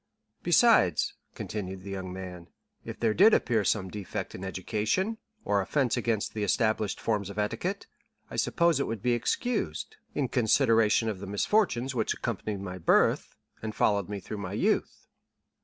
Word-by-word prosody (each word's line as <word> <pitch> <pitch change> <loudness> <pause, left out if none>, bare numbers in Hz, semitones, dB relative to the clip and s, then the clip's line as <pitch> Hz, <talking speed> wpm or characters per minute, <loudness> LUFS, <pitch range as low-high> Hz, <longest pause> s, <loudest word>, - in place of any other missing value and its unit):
"Besides," - - +4 0.2
continued 95 -3 -5
the 100 - -7
young 95 -1 -5
man, 90 -2 -8 0.4
"if - - -8
there 115 -2 +2
did 210 - +6
appear 110 -3 +1
some 95 -2 +1
defect 100 0 -5
in 95 - -7
education, 110 - -1 0.3
or 100 -1 +2
offence 130 +4 +1
against 110 -3 -1
the 105 - -2
established 110 0 +1
forms 105 -3 -1
of 100 - -9
etiquette, 175 - -2 0.4
I - - -8
suppose 170 -4 +2
it 140 - 0
would 115 -3 -4
be 125 - +3
excused, 245 - -2 0.2
in 140 -3 +1
consideration 115 -2 +3
of 105 -4 -2
the 100 - -7
misfortunes 130 - +1
which 115 -3 0
accompanied 105 -2 -3
my 90 -1 -6
birth, 80 - +2 0.3
and 110 -1 -5
followed 100 -2 +1
me 100 -1 -4
through 105 +3 -7
my 95 -1 -5
youth." - - 0
105 Hz, 160 wpm, -28 LUFS, 100-120 Hz, 0.4 s, did